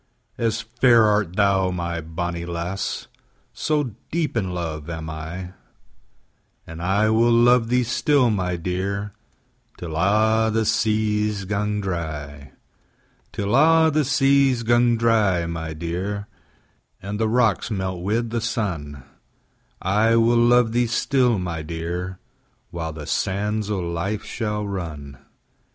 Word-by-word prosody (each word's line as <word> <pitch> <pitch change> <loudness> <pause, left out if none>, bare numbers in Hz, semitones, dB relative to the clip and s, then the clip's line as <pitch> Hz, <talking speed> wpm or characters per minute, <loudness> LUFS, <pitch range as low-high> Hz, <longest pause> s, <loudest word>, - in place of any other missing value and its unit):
As 115 0 0
fair 120 0 +4
art 105 -4 +1
thou, 95 -2 +3
my 85 -2 -3
bonnie 85 +2 -4
lass, 85 +3 -3
5 - - -18 0.5
So 155 -1 0 0.3
deep 160 -5 -1
in 110 -4 0
luve 85 -4 -4
am 80 -1 -5
I: 85 +4 -6 1.1
And 80 0 -9
I 100 +5 +2
will 115 +2 +3
luve 120 0 +4
thee 125 +1 +2
still, 130 +1 +2
my 90 -3 -1
dear, 95 +4 -3 0.6
Till 80 -3 -6
a' 110 +5 +3
the 110 0 +1
seas 105 -2 0
gang 105 +1 -1
dry: 75 -6 -5 0.8
Till 100 +3 -1
a' 160 +3 +5
the 155 +1 +2
seas 135 -2 +3
gang 120 0 +3
dry, 110 -7 +2
my 80 -1 -4
dear, 90 +5 -4 0.7
And 100 +2 -5
the 110 -1 +1
rocks 115 -4 +2
melt 95 -4 -3
wi' 105 +6 0
the 115 0 -3
sun; 95 -11 -3
10 70 -3 -12 0.8
I 105 +5 +3
will 115 +1 +4
luve 120 -1 +4
thee 120 +1 +1
still, 125 0 +2
my 90 -3 -3
dear, 85 +3 -5 0.5
While 80 -2 -4
the 75 -1 -8
sands 105 +5 -1
o' 105 - -1
life 85 +5 -3
shall 105 -2 -3
run. 75 -8 -6
100 Hz, 135 wpm, -23 LUFS, 85-115 Hz, 1.1 s, a